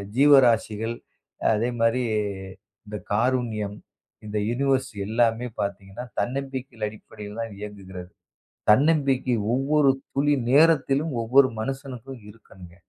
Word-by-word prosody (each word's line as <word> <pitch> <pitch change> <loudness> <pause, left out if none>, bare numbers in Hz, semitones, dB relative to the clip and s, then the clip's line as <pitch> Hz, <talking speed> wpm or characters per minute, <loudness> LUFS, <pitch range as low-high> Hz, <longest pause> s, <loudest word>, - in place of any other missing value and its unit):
ஜீவராசிகள் 120 -5 +4 0.6
அதே 115 +3 0
மாரி 115 +2 +2 0.8
இந்தக் 105 -2 -8
காருண்யம், 110 -3 0 0.5
இந்த 105 0 -3
யுனிவர்ஸ் 135 +1 0 0.2
எல்லாமே 115 +1 +1
பாத்தீங்கன்னா 100 +3 -5
தன்னம்பிக்கையில் 130 -1 -3
அடிப்படையில்தான் 105 0 -8
இயங்குகிறது. 95 -3 -9 0.6
தன்னம்பிக்கை 135 -2 +2 0.2
ஒவ்வொரு 140 +1 +3 0.2
துளி 145 +1 +2 0.2
நேரத்திலும் 150 0 +3
ஒவ்வொரு 130 +3 +5
மனுசனுக்கும் 130 -1 -6
இருக்கணுங்க. 95 -5 -15
120 Hz, 90 wpm, -24 LUFS, 105-135 Hz, 0.8 s, ஒவ்வொரு